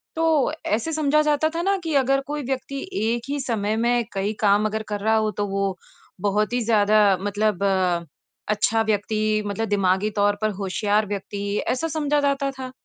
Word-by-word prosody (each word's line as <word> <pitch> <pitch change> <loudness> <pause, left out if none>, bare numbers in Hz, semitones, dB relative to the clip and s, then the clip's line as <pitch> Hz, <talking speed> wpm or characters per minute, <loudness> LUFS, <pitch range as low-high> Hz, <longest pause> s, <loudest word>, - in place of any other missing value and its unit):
तो 320 -4 +2
ऐसे 235 +10 -1
समझा 305 -1 +2
जाता 300 +1 +2
था 340 - 0
ना 395 +2 +2
कि 325 -2 -2
अगर 275 +1 +2
कोई 295 -1 -3
व्यक्ति 270 +1 -4 0.2
एक 230 +1 0
ही 285 - -1
समय 220 -5 -1
में 240 +1 +2
कई 200 +2 -1
काम 205 0 +3
अगर 215 0 -2
कर 205 -1 -2
रहा 220 +2 +2
हो 215 -1 +1
तो - - +1
वो 195 -1 -1 0.5
बहुत 210 +3 0
ही 245 - +1
ज़्यादा 215 -1 +4 0.2
मतलब 205 0 0 0.9
अच्छा 215 +1 +2
व्यक्ति 215 0 0
मतलब 205 +2 -2
दिमागी 195 0 +2
तौर 205 0 +3
पर 215 - +2
होशियार 205 +2 +1
व्यक्ति 200 0 -5 0.2
ऐसा 290 +6 0
समझा 295 -1 +1
जाता 280 -1 0
था। 260 -1 -8
220 Hz, 180 wpm, -23 LUFS, 205-275 Hz, 0.9 s, ज़्यादा